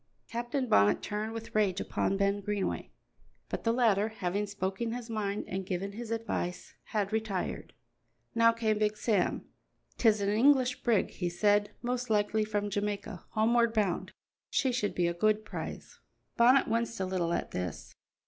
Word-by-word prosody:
Captain 240 +3 -2
Bonnet 100 - +4
turned 210 +1 -3
with 225 0 -7
rage 200 -3 +2
upon 195 - -1
Ben 200 +1 +1
Greenway, 205 0 -2 0.6
but - - -4
the 230 - +2
latter, 220 -4 +3
having 205 -1 -2
spoken 200 +3 -3
his 240 -1 -6
mind 205 -2 -2
and 190 +1 -3
given 185 +2 -3
his 225 +2 -7
advice, 225 -6 -3
had 210 -1 -2
retired. 215 -4 -2 0.6
Now 230 0 +5
came 220 -2 0
Big 215 0 +1
Sam. 210 -5 0 0.5
"'Tis 220 -3 +4
an 200 0 0
English 255 +3 +4
brig," 230 -5 +2
he 175 -2 -2
said, 205 +3 +2
"most 245 0 -2
likely 215 0 +2
from 205 -1 -2
Jamaica, 205 -3 -3
homeward 230 +1 +3
bound; 200 -5 0 0.4
she 265 - +1
should 235 -4 -1
be 175 - +2
a 170 - +1
good 215 +4 +1
prize." - - -7 0.4
Bonnet 255 +3 +5
winced 230 0 -1
a 190 - 0
little 185 -2 -1
at - - -2
this. 90 -3 -5
210 Hz, 160 wpm, -30 LUFS, 200-230 Hz, 0.6 s, Now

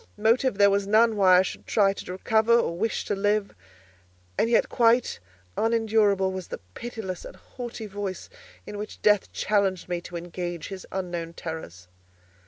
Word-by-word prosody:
Motive 225 +2 +2
there 200 0 +6
was 200 0 +1
none 220 +2 +4
why 185 -3 +6
I - - +6
should - - -7
try 195 -2 +3
to 190 - -8
recover 220 +4 +2
or 170 -7 0
wish 220 +5 -1
to - - -1
live; 205 +1 0 0.8
and 230 - +1
yet 235 - +3
quite 235 +1 +2 0.4
unendurable 220 -4 +2
was 185 -1 -6
the - - -5 0.2
pitiless 220 -7 -6
and - - -10
haughty 240 -2 -8
voice 200 -2 -5 0.4
in 205 - -7
which 210 - -8
Death 210 -2 +3
challenged 195 -3 0
me 175 -1 -2
to 175 - -10
engage 175 -1 -5
his 190 -2 -8
unknown 175 -3 -4
terrors. 160 - -7
200 Hz, 165 wpm, -26 LUFS, 185-220 Hz, 0.8 s, there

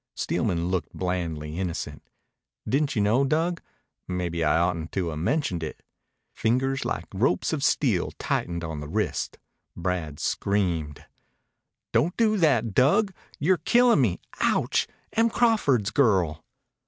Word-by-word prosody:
Steelman 85 0 -1
looked 95 -2 -2
blandly 85 -3 -3
innocent. 90 -3 -4 0.7
"Didn't 140 +1 +1
you 105 - +2
know, 115 +7 +3
Dug? 165 +5 0 0.5
Maybe 85 -2 -2
I 75 - +3
ought 85 +1 +2
n't 80 0 -6
to 90 -4 -1
'a' - - -5
mentioned 90 - -1
it." 80 - -6 0.5
Fingers 135 +4 0
like - - -3
ropes - - +1
of - - -2
steel - - +2
tightened 85 -1 -2
on 80 -2 -4
the 75 - -6
wrist, - - -2 0.4
Brad 85 -4 -3
screamed. 85 -7 -1 0.9
"Don't 175 +4 +2
do 220 -2 +3
that, 120 - +2
Dug! 195 - +3 0.2
You're 180 +5 +3
killin' 235 - +4
me! 95 -9 +1 0.2
Ouch! - - +2 0.3
Em 230 +1 +3
Crawford's 175 - +2
girl." 95 - +2
100 Hz, 135 wpm, -26 LUFS, -, 0.9 s, killin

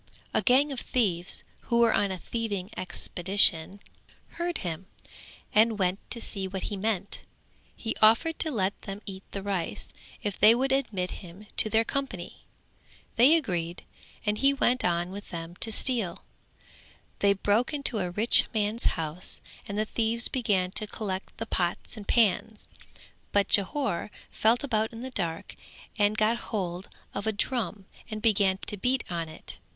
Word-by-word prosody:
A - - +3
gang 270 +3 +4
of 265 - -3
thieves 190 -9 0 0.3
who 235 - +3
were 235 - +5
on 200 - +2
a 190 - -3
thieving 205 -2 -3
expedition 185 0 +2 0.5
heard 345 0 -3
him 175 +2 -4 0.7
and 220 0 +4
went 185 0 +1
to 235 - -3
see 195 -4 -2
what 190 0 -5
he - - -1
meant; 200 -1 -2 0.5
he 225 - -3
offered 230 +10 +5
to 315 - 0
let 200 -8 -1
them 200 +1 -7
eat 190 -1 -7
the 195 - -5
rice 195 -4 -3 0.3
if 205 -2 -3
they 220 +2 +8
would 265 +2 0
admit 215 -10 0
him 180 +3 -12
to 215 - +7
their 220 +1 +3
company; 275 +3 -4 0.7
they 260 +8 +7
agreed 175 - -2 0.4
and 210 0 0
he 275 +1 +4
went 255 -1 +2
on 175 +1 0
with 205 +2 -8
them 165 0 -6
to 225 - +2
steal; 220 -6 +1 1.0
they 200 0 +4
broke 205 +6 +1
into 280 -6 -1
a 180 -2 -1
rich 210 +6 +4
man's 215 +2 0
house 165 +2 -2 0.3
and 200 - -4
the 215 - +1
thieves 230 +2 0
began 205 -8 0
to 215 +2 +3
collect 195 -3 -5
the 225 - -3
pots 175 -3 -2
and 210 -2 -9
pans 220 -1 +2 0.6
but 200 -1 +2
Jhore 205 -1 +1 0.2
felt 230 +4 +2
about 220 -4 0
in 225 - -8
the 260 - -6
dark 170 -8 -3 0.4
and 210 0 +2
got 215 +2 +3
hold 185 -3 -3 0.2
of 200 +2 -3
a - - +3
drum 210 -3 -2 0.2
and 215 -1 -4
began 200 -4 +3
to 205 - 0
beat 250 +5 +1
on 165 -2 -3
it. 155 - -10
210 Hz, 165 wpm, -28 LUFS, 185-230 Hz, 1.0 s, they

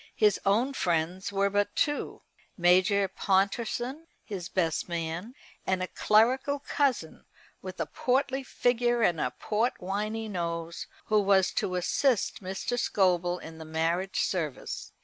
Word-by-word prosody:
His 210 -2 +3
own 235 +8 +2
friends 175 -2 -1
were 200 0 +1
but 205 0 0
two, 290 -1 -1 0.3
Major 185 +3 +4
Pontorson, 230 - -1 0.2
his 185 -5 -6
best 165 -2 0
man, 170 +7 -4 0.3
and 185 -1 +1
a - - -2
clerical 255 +10 +3
cousin, 275 - -1 0.4
with 185 -1 -8
a - - 0
portly 265 +1 0
figure 240 -2 +1
and 170 -6 +2
a 125 - 0
portwiney 215 0 -1
nose, 170 -3 -4 0.2
who 215 -1 +3
was 195 -2 +3
to 185 - -1
assist 220 +8 +1
Mr. 195 +6 -3
Scobel 180 -5 +2
in 160 -2 -10
the - - -7
marriage 165 +4 -1
service. 160 -7 -3
195 Hz, 130 wpm, -28 LUFS, 175-235 Hz, 0.4 s, Major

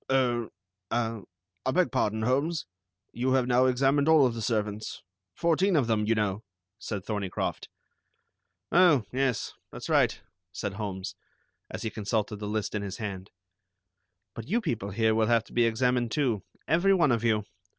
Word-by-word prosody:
"Er, 120 -3 +2 0.4
ah, 115 -2 -1 0.4
I - - -1
beg 170 -2 +2
pardon, 110 +1 0
Holmes, 140 +7 0 0.5
you 130 +2 0
have 130 -2 +3
now 125 +1 +4
examined 135 +3 +2
all 155 -4 +7
of 125 - +1
the 115 - -5
servants. 105 -1 -2 0.3
Fourteen 170 +3 +2
of 140 -6 +3
them, 110 -2 +1
you 115 - +3
know," 105 0 -1 0.4
said 100 -3 -5
Thorneycroft. 100 -4 -3 1.0
"Oh, 170 - +5
yes. 130 -4 -1 0.2
That's - - -7
right," - - +3 0.3
said 100 +1 -4
Holmes, 100 -2 -5 0.6
as - - -6
he 110 - -2
consulted 105 +1 -2
the 105 0 -5
list 105 0 -2
in 105 - -1
his 100 -1 -5
hand; 100 -3 -5 1.0
"but 115 0 -8
you 225 +6 +2
people 120 - -3
here 110 +2 +2
will 110 0 +2
have 115 -1 +3
to - - -17
be 120 -1 +4
examined 120 +1 +1
too, 125 -9 0 0.3
every 180 +5 +4
one 170 -7 +3
of 115 -1 +1
you. 110 -3 +2
115 Hz, 165 wpm, -28 LUFS, 105-135 Hz, 1.0 s, all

